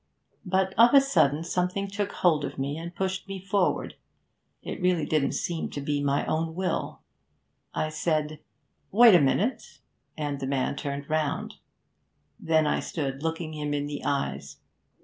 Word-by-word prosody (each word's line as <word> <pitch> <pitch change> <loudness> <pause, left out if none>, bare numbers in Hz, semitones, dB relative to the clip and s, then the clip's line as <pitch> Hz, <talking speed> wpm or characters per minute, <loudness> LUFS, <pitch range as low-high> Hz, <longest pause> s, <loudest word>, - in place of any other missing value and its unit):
But 190 +1 +1
of 240 +4 +7
a - - +11
sudden 160 - +2
something 180 +3 -1
took 200 0 -3
hold 160 -5 +2
of - - -5
me, 140 +2 -2
and 170 +2 -7
pushed 190 0 -2
me 195 -1 -5
forward, 195 0 0 0.7
it - - -6
really 180 -4 +2
didn't 145 -3 +1
seem 170 -2 -2
to - - -6
be 145 0 -1
my 140 0 +1
own 160 +1 -1
will. 185 0 -3 0.7
I 155 - 0
said, 155 -1 -1 0.5
"Wait 230 +1 +8
a 175 - +7
minute"; 195 - 0 0.4
and 145 -2 -3
the 135 - -3
man 135 0 0
turned 140 -1 -4
round. 155 -2 -2 0.8
Then 160 -1 +2
I 150 - +1
stood 135 -4 -4
looking 160 0 -3
him 150 -1 -2
in 145 0 -1
the 145 0 -5
eyes. 70 - -2
155 Hz, 160 wpm, -27 LUFS, 145-185 Hz, 0.8 s, a